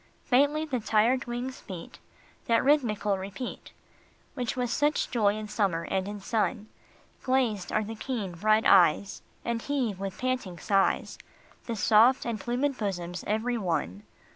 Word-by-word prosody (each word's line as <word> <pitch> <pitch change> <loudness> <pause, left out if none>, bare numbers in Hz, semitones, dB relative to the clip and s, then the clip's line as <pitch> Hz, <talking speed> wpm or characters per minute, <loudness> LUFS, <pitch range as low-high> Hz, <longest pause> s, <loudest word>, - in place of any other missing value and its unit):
Faintly 290 +4 +3
the 265 -5 -2
tired 225 +4 +2
wings 245 +2 -5
beat 180 -4 -8 0.5
That 230 -1 +3
rhythmical 215 -9 +2
repeat 195 +6 -7 0.6
Which 245 -2 -3
was 245 -2 -1
such 295 +1 +1
joy 210 -4 +2
in 215 0 -5
summer 195 -6 0
and 190 0 0
in 205 0 -6
sun; 215 +1 -1 0.5
Glazed 240 -8 0
are 215 - +1
the 220 +2 -6
keen, 225 -4 -4
bright 215 +6 +2
eyes, 185 +1 +4 0.2
And 235 -1 -1
heave 250 -9 -2
with 195 -1 -5
panting 255 -9 -2
sighs 195 +2 +1 0.5
The 230 - -2
soft 225 +5 +4
and 230 -2 -2
plumed 250 +6 -1
bosoms 180 -4 -3
every 230 +3 0
one. 160 - -2
220 Hz, 145 wpm, -28 LUFS, 195-250 Hz, 0.6 s, eyes